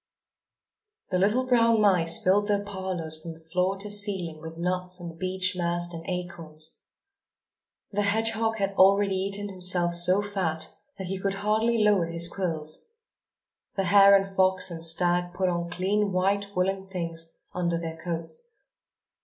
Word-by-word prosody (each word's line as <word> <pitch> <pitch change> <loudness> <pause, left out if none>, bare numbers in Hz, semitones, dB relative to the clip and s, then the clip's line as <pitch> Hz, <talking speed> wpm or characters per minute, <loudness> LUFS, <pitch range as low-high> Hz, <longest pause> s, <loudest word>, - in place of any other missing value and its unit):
The 180 - +1
little 215 +7 +2
brown 230 -3 +3
mice 180 -5 +4
filled 205 +3 +3
their 205 -1 +1
parlors 185 -6 -4
from 165 0 -8
floor 180 +4 -2
to 200 +2 -5
ceiling 190 -6 0
with 160 0 -9
nuts 180 +1 -2
and 170 -1 -9
beech 185 0 0
mast 175 0 -1
and 165 0 -7
acorns. 170 -4 -6 1.1
The 205 0 0
hedgehog 225 +2 +1
had 195 -1 -1
already 195 +1 +5
eaten 200 +2 -2
himself 180 -2 -1
so 180 +3 +4
fat 185 -6 -1 0.2
that 190 - -5
he 190 +1 -4
could 195 0 -2
hardly 220 +1 +2
lower 205 -5 +3
his 170 0 -1
quills. 165 - -3 0.9
The 195 - 0
hare 200 +2 +7
and 195 0 -4
fox 185 -1 +2
and 165 -1 -6
stag 175 +1 +3
put 185 0 0
on 170 -1 -2
clean 195 +3 0
white 200 +2 0
woollen 190 +1 -1
things, 165 -3 -5 0.2
under 170 -1 -1
their 165 -1 -6
coats. 170 - -6
185 Hz, 150 wpm, -26 LUFS, 170-200 Hz, 1.1 s, hare